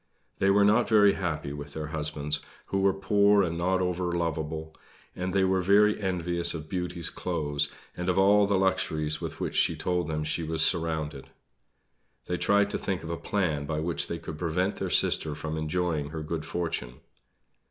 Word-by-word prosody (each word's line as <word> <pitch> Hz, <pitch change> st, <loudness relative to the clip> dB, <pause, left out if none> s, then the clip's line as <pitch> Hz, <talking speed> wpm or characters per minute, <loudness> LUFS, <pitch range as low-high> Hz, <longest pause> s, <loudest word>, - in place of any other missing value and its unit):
They 95 Hz, -, +3 dB
were 100 Hz, +1 st, +5 dB
not 110 Hz, +4 st, +3 dB
very 105 Hz, -3 st, +6 dB
happy 75 Hz, -6 st, -3 dB
with 70 Hz, 0 st, -8 dB
their 80 Hz, -1 st, -4 dB
husbands, 75 Hz, -1 st, -1 dB, 0.3 s
who 95 Hz, -, 0 dB
were 95 Hz, 0 st, +4 dB
poor 100 Hz, +1 st, +3 dB
and 85 Hz, -2 st, -2 dB
not 95 Hz, +2 st, +1 dB
over 90 Hz, -1 st, -1 dB
lovable; 80 Hz, -2 st, -3 dB, 0.4 s
and 90 Hz, +1 st, -3 dB
they 95 Hz, 0 st, +2 dB
were 95 Hz, 0 st, +2 dB
very 105 Hz, +3 st, +4 dB
envious 85 Hz, -3 st, +1 dB
of 80 Hz, -1 st, -7 dB
Beauty's 90 Hz, -1 st, -3 dB
clothes 75 Hz, -5 st, -1 dB, 0.3 s
and 90 Hz, +1 st, -3 dB
of 90 Hz, -, +1 dB
all 100 Hz, +1 st, +5 dB
the 100 Hz, -1 st, +2 dB
luxuries 80 Hz, -5 st, 0 dB
with -, -, -6 dB
which -, -, -3 dB
she -, -, +3 dB
told 90 Hz, -1 st, -1 dB
them 75 Hz, -1 st, -2 dB
she 80 Hz, +2 st, -1 dB
was 80 Hz, 0 st, +2 dB
surrounded. 80 Hz, -4 st, -1 dB, 1.0 s
They 90 Hz, -, -2 dB
tried 100 Hz, 0 st, +3 dB
to -, -, -2 dB
think 95 Hz, -4 st, -2 dB
of 85 Hz, -, -5 dB
a -, -, -1 dB
plan 80 Hz, -7 st, -1 dB
by 75 Hz, 0 st, -2 dB
which 80 Hz, 0 st, -2 dB
they -, -, -3 dB
could 75 Hz, -, -8 dB
prevent 90 Hz, +4 st, -1 dB
their -, -, -3 dB
sister 75 Hz, -2 st, +2 dB
from 80 Hz, +1 st, -4 dB
enjoying 80 Hz, -1 st, -1 dB
her 80 Hz, 0 st, -5 dB
good 80 Hz, 0 st, -4 dB
fortune. 80 Hz, -8 st, -3 dB
85 Hz, 185 wpm, -28 LUFS, 80-95 Hz, 1.0 s, very